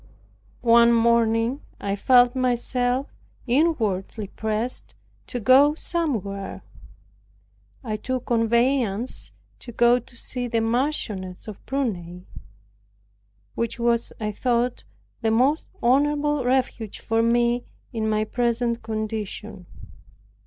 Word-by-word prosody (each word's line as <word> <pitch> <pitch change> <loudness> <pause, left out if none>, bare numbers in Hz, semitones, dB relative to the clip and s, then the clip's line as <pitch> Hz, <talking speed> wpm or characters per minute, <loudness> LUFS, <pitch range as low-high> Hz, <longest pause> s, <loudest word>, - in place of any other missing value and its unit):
One 235 0 +6
morning 230 +2 +2 0.2
I 200 0 -2
felt 245 +3 +4
myself 250 +1 0 0.3
inwardly 225 - 0
pressed 220 +4 -4 0.3
to 245 - -4
go 270 +6 +5
somewhere. 220 - -3 1.2
I 215 -3 -3
took 255 +3 -3
a - - -25
conveyance 235 0 +1 0.3
to 240 - -9
go 240 +1 +4
to 240 +1 -17
see 245 +1 -4
the 230 -1 0
Marchioness 225 -6 -2
of 210 -3 -9
Prunai, 180 -10 -3 1.3
which 230 -1 -2
was, 235 0 +1
I 210 -1 -2
thought, 240 +2 -1 0.4
the 225 - +1
most 260 +8 +2 0.2
honorable 290 +2 +2
refuge 250 -4 0
for 225 0 0
me 240 +1 +2 0.3
in 220 -1 -1
my 215 0 +1
present 235 +1 -1
condition. 215 -3 -5
235 Hz, 105 wpm, -24 LUFS, 220-255 Hz, 1.3 s, One